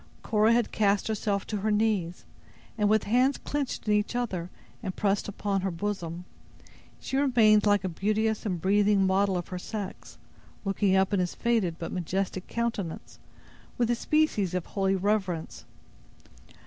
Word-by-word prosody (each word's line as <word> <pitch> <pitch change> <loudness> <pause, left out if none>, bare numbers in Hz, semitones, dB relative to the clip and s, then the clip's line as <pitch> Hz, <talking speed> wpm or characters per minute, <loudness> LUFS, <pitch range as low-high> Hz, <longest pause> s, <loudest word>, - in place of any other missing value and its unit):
Cora 215 0 +3
had 235 -1 +2
cast 200 -1 +2
herself 205 -2 -1
to 215 - -3
her 210 +2 -1
knees; 210 -5 0 0.5
and, 210 -2 +1
with 215 0 +3
hands 255 +5 +2
clenched 285 -6 -4
in 210 - +3
each 210 +3 0
other 190 -8 -2 0.3
and 190 -5 -4
pressed 200 -1 0
upon 200 -1 -2
her 190 - -1
bosom, 175 -2 -4 0.7
she 265 - -3
remained 225 -7 +4
like 205 -1 +3
a - - 0
beauteous 215 +5 0
and 185 -5 -2
breathing 200 +2 +3
model 190 0 +2
of 175 - -5
her 180 - -4
sex, 205 0 -7 0.5
looking 195 0 +2
up 190 +1 +2
in 200 - +2
his 180 -1 -1
faded 225 -8 +1
but 165 - -5
majestic 185 +1 -2
countenance, 230 -8 -4 0.6
with 240 -1 +2
a - - +2
species 230 - +1
of 180 - -2
holy 195 -1 0
reverence. 190 -4 -1
205 Hz, 160 wpm, -28 LUFS, 190-220 Hz, 0.7 s, remained